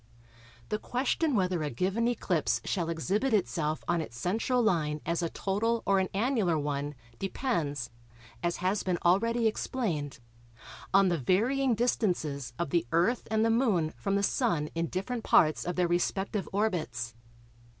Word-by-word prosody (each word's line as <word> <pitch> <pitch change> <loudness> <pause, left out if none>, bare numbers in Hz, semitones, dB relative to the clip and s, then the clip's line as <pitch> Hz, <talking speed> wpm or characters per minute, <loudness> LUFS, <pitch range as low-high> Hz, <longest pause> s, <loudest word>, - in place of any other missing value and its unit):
The 210 - -1
question 270 +5 0
whether 185 -4 +1
a 150 - -1
given 195 - 0
eclipse 190 -9 0
shall 170 -4 -1
exhibit 200 +9 +1
itself 155 -5 -1
on 175 -1 +1
its 115 -7 -8
central 225 - +1
line 155 -8 +1
as 170 +1 0
a 170 - -1
total 225 +6 -1
or 195 -1 +3
an 185 - 0
annular 205 - +1
one 145 0 -2 0.2
depends, 155 - -2 0.5
as 175 0 -1
has 195 +3 +2
been 180 -2 0
already 230 +6 +3
explained, 190 - -1 0.7
on 195 -1 +5
the 170 -2 0
varying 240 - +2
distances 175 - 0
of 170 -5 -2
the 170 -8 +1
Earth 180 +9 +2
and 220 0 +2
the 225 - +3
Moon 210 -10 +2
from 195 0 -2
the 200 - +1
Sun 175 - +1
in 165 0 -1
different 225 +7 -3
parts 155 -1 +4
of 175 - -2
their 180 -1 +2
respective 190 +3 -1
orbits. 155 - -1
185 Hz, 155 wpm, -29 LUFS, 160-225 Hz, 0.7 s, on